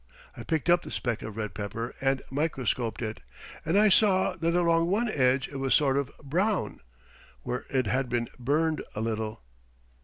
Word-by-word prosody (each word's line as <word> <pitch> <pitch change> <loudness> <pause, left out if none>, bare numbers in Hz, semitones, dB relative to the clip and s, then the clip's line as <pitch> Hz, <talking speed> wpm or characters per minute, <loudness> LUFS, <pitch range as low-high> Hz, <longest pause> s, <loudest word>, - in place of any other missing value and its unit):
I - - -8
picked 160 -2 -1
up 175 0 +5
the - - -9
speck 120 -3 -2
of 110 0 -7
red 105 -3 -3
pepper 110 +4 -4
and 135 0 +1
microscoped 130 -6 -1
it, 110 0 -4 0.4
and 165 +5 +1
I 215 +1 +6
saw 190 -2 +4
that 170 0 0
along 170 -1 +3
one 210 +6 +1
edge 130 - +2
it 140 - -6
was 135 -1 +2
sort 140 -3 +3
of 140 -1 0
brown, 185 +8 0 0.6
where 125 - -3
it 130 -2 +1
had 130 +4 0
been 120 -1 0
burned 155 +5 +1
a 105 - -2
little." 110 - -3
135 Hz, 180 wpm, -28 LUFS, 120-170 Hz, 0.6 s, I